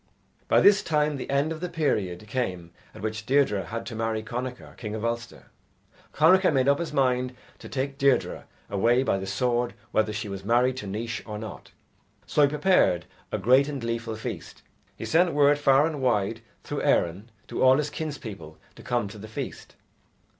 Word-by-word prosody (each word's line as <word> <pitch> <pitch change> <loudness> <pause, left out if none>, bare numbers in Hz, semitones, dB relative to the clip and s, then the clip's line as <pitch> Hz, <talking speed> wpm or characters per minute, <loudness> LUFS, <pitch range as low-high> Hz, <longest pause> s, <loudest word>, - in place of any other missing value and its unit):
By - - +4
this 205 0 +6
time 150 -5 +1
the 130 - -6
end 140 +3 +1
of 160 - -4
the 180 +1 -4
period 105 - -1
came 95 -8 -3 0.2
at - - -10
which 110 0 -3
Deirdre 130 -8 +2
had 115 +1 -5
to 120 - -6
marry 110 0 -1
Connachar, 125 +2 -6
king 105 -2 -5
of 110 +1 -4
Ulster. 115 0 -5 0.6
Connachar 185 +5 +5
made 135 -2 +2
up 140 0 +4
his 170 - -3
mind 125 -1 +1 0.2
to - - -10
take 135 +1 -3
Deirdre 140 -1 +1 0.2
away 115 +6 +2
by 95 - +1
the 95 - -5
sword 120 +3 0 0.2
whether 110 0 +1
she 105 0 -4
was 100 -1 -6
married 125 +4 +2
to 105 - -5
Naois 115 +4 -4
or 105 -1 -5
not. 110 -2 -8 0.6
So - - +1
he 145 - +7
prepared 140 - +2 0.3
a - - 0
great 130 +8 +4
and 145 -2 -4
gleeful 115 -1 -3
feast. 110 - -7 0.3
He - - -6
sent 170 +1 +3
word 145 0 +4
far 140 0 +5
and 155 -4 -3
wide 115 -3 +1 0.2
through - - -4
Erin 95 +7 +1 0.2
to - - -4
all 130 0 +6
his 150 0 -1
kinspeople 110 - -6 0.2
to - - -13
come 120 -4 -1
to 105 +1 -10
the 110 - -9
feast. 110 - -7
125 Hz, 190 wpm, -26 LUFS, 110-140 Hz, 0.6 s, he